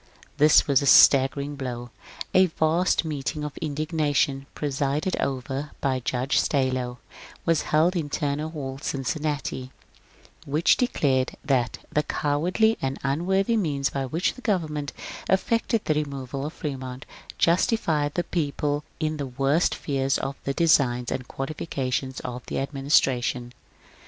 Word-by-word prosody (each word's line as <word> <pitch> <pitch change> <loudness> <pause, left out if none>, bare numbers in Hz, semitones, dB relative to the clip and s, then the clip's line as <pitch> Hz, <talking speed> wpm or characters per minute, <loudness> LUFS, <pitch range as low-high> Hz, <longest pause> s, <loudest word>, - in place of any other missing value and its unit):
This 150 +1 +6
was 140 -2 +3
a 140 - -1
staggering 140 +2 +6
blow. 120 -3 -5 0.4
A 185 0 +6
vast 165 +2 +1
meeting 150 0 -3
of 150 -1 -4
indigna 155 -1 -1
tion, 135 0 +1
presided 145 +4 -1
over 135 +2 -2
by 130 -2 0
Judge 125 +2 0
Stallo, 130 -3 0 0.5
was 165 -2 +3
held 160 +5 +3
in 160 -4 -2
Turner 145 +2 -1
Hall, 135 -4 -6
Cincinnati, 140 -2 -2 0.7
which 150 +4 +3
declared 140 - +1
that 125 -3 +1
^^ - - -24
the 150 - +3
cowardly 175 +11 +1
and 135 0 -2
unworthy 190 +10 +1
means 145 -9 0
by 135 -1 -2
which 165 +7 0
the 255 - -13
government 155 - -1 0.4
effected 230 +3 +1
the 155 - +2
removal 140 -2 -3
of 155 - -7
Fremont 130 -5 -6 0.3
justifies 165 -5 +2
the 175 - +1
people 145 -3 -1 0.2
in 155 -1 -1
the 140 -2 -3
worst 135 +6 +1
fears 135 -2 0
of 135 0 -3
the 140 - 0
designs 130 -7 +3
and 125 -1 -3
qualifications 135 -2 -3
of 125 0 -6
the - - -3
administration." 135 -3 +1
145 Hz, 135 wpm, -25 LUFS, 135-155 Hz, 0.7 s, This